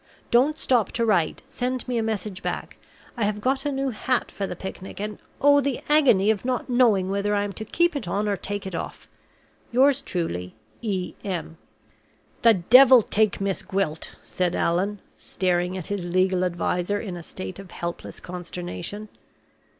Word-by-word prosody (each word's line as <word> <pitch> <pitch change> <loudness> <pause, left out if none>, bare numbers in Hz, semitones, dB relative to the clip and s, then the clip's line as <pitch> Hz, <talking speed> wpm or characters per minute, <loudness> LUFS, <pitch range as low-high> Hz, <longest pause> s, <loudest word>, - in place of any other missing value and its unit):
Don't 275 +6 +4
stop 240 -9 +1
to 235 - +1
write; 190 -8 +1
send 255 0 -3
me 245 -2 0
a - - +1
message 210 -3 -3
back. - - -4 0.4
I 235 - -1
have 210 0 -1
got 265 +5 0
a - - 0
new 270 -1 -1
hat 250 +3 -1
for 195 - -3
the 180 - -5
picnic; 190 +1 -8
and 210 +1 -4 0.2
oh, 285 0 +6
the 275 -2 -1
agony 250 -10 +5
of 205 -3 -2
not 250 0 -1
knowing 225 -7 +3
whether 200 +1 0
I 205 - +1
am 205 -1 -4
to 220 - -6
keep 345 +7 +1
it 280 - -4
on 205 +4 -1
or 205 - +1
take 205 +1 -4
it 190 - -6
off. - - -6 0.6
Yours 270 +3 +4
truly, 90 - -3 0.3
E. 195 -5 -2
M." 175 -4 -4 0.8
"The 230 -2 +6
devil 245 +6 +7
take 215 0 +1
Miss 195 -1 -1
Gwilt!" 190 -5 -2
said 180 -1 -1
Allan, 190 +4 0 0.2
staring 180 0 -1
at 180 - -5
his 205 -3 -3
legal 185 +1 +1
adviser 180 +2 0
in 190 -5 -5
a 175 - -7
state 185 +2 -7
of 195 -2 -10
helpless 170 0 -6
consternation. 180 +3 -6
205 Hz, 175 wpm, -25 LUFS, 180-240 Hz, 0.8 s, devil